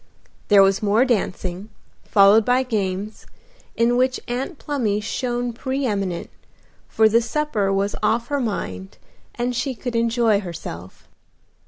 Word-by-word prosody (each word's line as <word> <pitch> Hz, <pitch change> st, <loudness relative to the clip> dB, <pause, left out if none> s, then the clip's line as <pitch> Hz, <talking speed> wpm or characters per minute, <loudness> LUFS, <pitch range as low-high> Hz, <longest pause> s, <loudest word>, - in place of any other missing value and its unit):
There 200 Hz, -1 st, +7 dB
was 195 Hz, 0 st, +2 dB
more 215 Hz, +4 st, +3 dB
dancing, 195 Hz, -4 st, -2 dB, 0.3 s
followed 200 Hz, +2 st, +5 dB
by 250 Hz, +4 st, +2 dB
games, 205 Hz, -3 st, -3 dB, 0.5 s
in 235 Hz, +1 st, +2 dB
which 255 Hz, 0 st, +1 dB
Aunt 260 Hz, +7 st, -4 dB
Plumy 235 Hz, -10 st, -1 dB
shone 240 Hz, +2 st, -3 dB
pre 265 Hz, +4 st, -3 dB
eminent, 195 Hz, -6 st, -2 dB, 0.6 s
for 220 Hz, 0 st, +3 dB
the 230 Hz, +2 st, +3 dB
supper 230 Hz, -5 st, -1 dB
was 195 Hz, +1 st, 0 dB
off 235 Hz, +1 st, 0 dB
her 285 Hz, -1 st, 0 dB
mind 95 Hz, -, -4 dB, 0.4 s
and 245 Hz, +1 st, -2 dB
she 260 Hz, +2 st, -2 dB
could 245 Hz, +1 st, -5 dB
enjoy 230 Hz, -2 st, +2 dB
herself. 165 Hz, -, -9 dB
225 Hz, 135 wpm, -22 LUFS, 200-245 Hz, 0.6 s, There